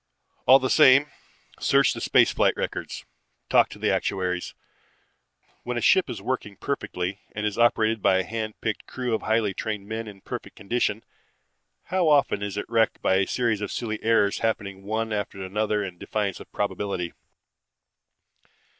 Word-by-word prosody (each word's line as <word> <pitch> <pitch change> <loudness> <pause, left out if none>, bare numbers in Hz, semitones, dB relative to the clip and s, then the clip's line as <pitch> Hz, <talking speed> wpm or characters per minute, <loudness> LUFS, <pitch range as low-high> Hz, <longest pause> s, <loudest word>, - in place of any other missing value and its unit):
"All 130 +2 +9
the 130 -1 -1
same, 135 +3 +6 0.5
search - - +3
the - - -7
space - - +4
flight - - +2
records, - - -4 0.5
talk - - +5
to - - -10
the - - +1
actuaries. 90 -2 -2 1.1
When 125 0 -4
a - - -1
ship 190 +8 +4
is - - -6
working 105 -6 -3
perfectly 95 -8 -3
and 105 0 -3
is 105 -1 -1
operated 115 -2 +3
by 95 - +4
a 95 - +1
hand 110 0 -5
picked 110 -1 -3
crew 125 -2 -3
of 110 - 0
highly 110 -2 +1
trained 105 0 -4
men 110 +1 -4
in 100 -2 -11
perfect - - -7
condition, 110 +1 -1 0.8
how 180 -1 0
often 140 -8 +3
is 100 -1 -4
it 105 - -2
wrecked 115 -1 +1
by 95 - +3
a 95 - +1
series 115 -4 0
of 105 - -3
silly 110 -3 -3
errors 110 -3 +2
happening 100 -4 -2
one 110 +1 -2
after 100 -2 -3
another 105 +2 -1
in 90 -3 -7
defiance 100 -3 -2
of - - -13
probability? 100 -3 -3
110 Hz, 165 wpm, -25 LUFS, 100-115 Hz, 1.1 s, All